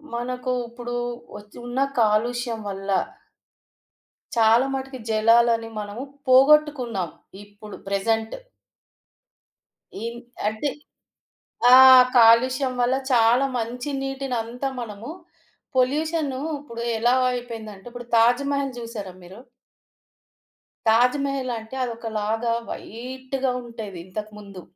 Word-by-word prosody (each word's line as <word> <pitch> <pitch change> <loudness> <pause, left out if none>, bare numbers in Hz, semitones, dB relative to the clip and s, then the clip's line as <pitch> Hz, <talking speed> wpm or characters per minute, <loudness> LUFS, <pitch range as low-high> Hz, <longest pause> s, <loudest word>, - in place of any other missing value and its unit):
మనకు 250 +1 -3 0.2
ఇప్పుడు 240 +1 -7 0.4
వచ్ 210 0 -12
ఉన్న 245 +2 -3 0.2
కాలుష్యం 230 +2 +1
వల్ల... 195 0 -7 1.5
చాలా 230 +2 +4
మటుకు 265 -1 -5
జలాలని 230 +1 +3
మనము 210 +4 -6 0.2
పోగొట్టుకున్నాం 260 - +4 0.3
ఇప్పుడు 205 +1 -12
ప్రెజెంట్. 220 +3 -1 1.7
ఈ‌న్ 235 +1 -5 0.3
అంటే 220 +7 -1 1.0
ఆ! - - +10 0.4
కాలుష్యం 255 +3 +5
వల్ల 245 +2 +2 0.2
చాలా 240 +2 +4
మంచి 245 +4 -4
నీటినంతా 265 -2 -3
మనము 220 +2 -8 0.7
పొల్యూషన్ 300 +3 +1 0.3
ఇప్పుడు 235 -5 -9 0.2
ఎలా 240 +2 +3 0.2
అయిపోయిందంటే 225 -4 -7
ఇప్పుడు 245 -1 -9
తాజ్ 240 +4 +4
మహల్ 275 -2 -2
జూసారా 220 -6 -7
మీరు? 190 +7 -12 1.5
తాజ్ 245 +5 +4
మహలంటే 255 -4 -4
అదొకలాగా 225 -1 -2 0.2
వైట్‌గా 260 +3 -4
ఉండేది 220 -6 -8
ఇంతకు 210 +3 -7
ముందు. 200 -3 -11
235 Hz, 90 wpm, -23 LUFS, 220-255 Hz, 1.7 s, ఆ